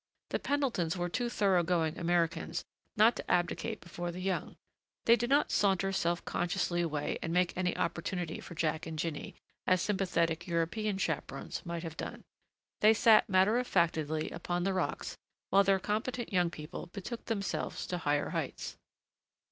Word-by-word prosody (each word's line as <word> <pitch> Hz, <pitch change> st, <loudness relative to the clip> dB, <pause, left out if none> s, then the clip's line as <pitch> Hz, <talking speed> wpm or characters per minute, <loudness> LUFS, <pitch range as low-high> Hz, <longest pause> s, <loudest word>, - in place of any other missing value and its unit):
The -, -, 0 dB
Pendletons 245 Hz, -, 0 dB
were 175 Hz, 0 st, -1 dB
too 240 Hz, +6 st, -1 dB
thorough 195 Hz, -6 st, +3 dB
going 165 Hz, -2 st, +1 dB
Americans 170 Hz, -1 st, 0 dB, 0.3 s
not 220 Hz, +3 st, +6 dB
to -, -, -4 dB
abdicate 180 Hz, +5 st, 0 dB
before 175 Hz, 0 st, -5 dB
the 175 Hz, -, -7 dB
young. 190 Hz, 0 st, -2 dB, 0.5 s
They 230 Hz, -, +7 dB
did 240 Hz, +1 st, -2 dB
not 285 Hz, +2 st, +3 dB
saunter 195 Hz, -1 st, +2 dB
self 175 Hz, -2 st, 0 dB
consciously 175 Hz, 0 st, 0 dB
away 150 Hz, -3 st, -1 dB
and 165 Hz, -, -2 dB
make 180 Hz, 0 st, +2 dB
any 180 Hz, -1 st, 0 dB
opportunity 170 Hz, -1 st, -2 dB
for 170 Hz, -, -9 dB
Jack 160 Hz, -1 st, -1 dB
and 160 Hz, -1 st, -5 dB
Jinny, 155 Hz, -2 st, -3 dB, 0.3 s
as 185 Hz, 0 st, +4 dB
sympathetic 175 Hz, -4 st, 0 dB
European 185 Hz, +5 st, 0 dB
chaperons 150 Hz, -6 st, -3 dB
might 170 Hz, 0 st, -3 dB
have 165 Hz, -1 st, -6 dB
done; -, -, -5 dB, 0.6 s
they 215 Hz, +1 st, +6 dB
sat 220 Hz, 0 st, +6 dB
matter 195 Hz, +5 st, +4 dB
of 250 Hz, -, -2 dB
factedly 155 Hz, -2 st, +1 dB
upon 175 Hz, +1 st, -2 dB
the 195 Hz, +1 st, +1 dB
rocks 185 Hz, -, -2 dB, 0.3 s
while 200 Hz, +1 st, +6 dB
their 195 Hz, 0 st, +4 dB
competent 215 Hz, +5 st, -2 dB
young 180 Hz, -2 st, +3 dB
people 155 Hz, +1 st, -7 dB
betook 200 Hz, +6 st, -7 dB
themselves 200 Hz, -5 st, -2 dB
to 180 Hz, -, -3 dB
higher 145 Hz, -2 st, +1 dB
heights. -, -, -4 dB
180 Hz, 165 wpm, -32 LUFS, 170-200 Hz, 0.6 s, They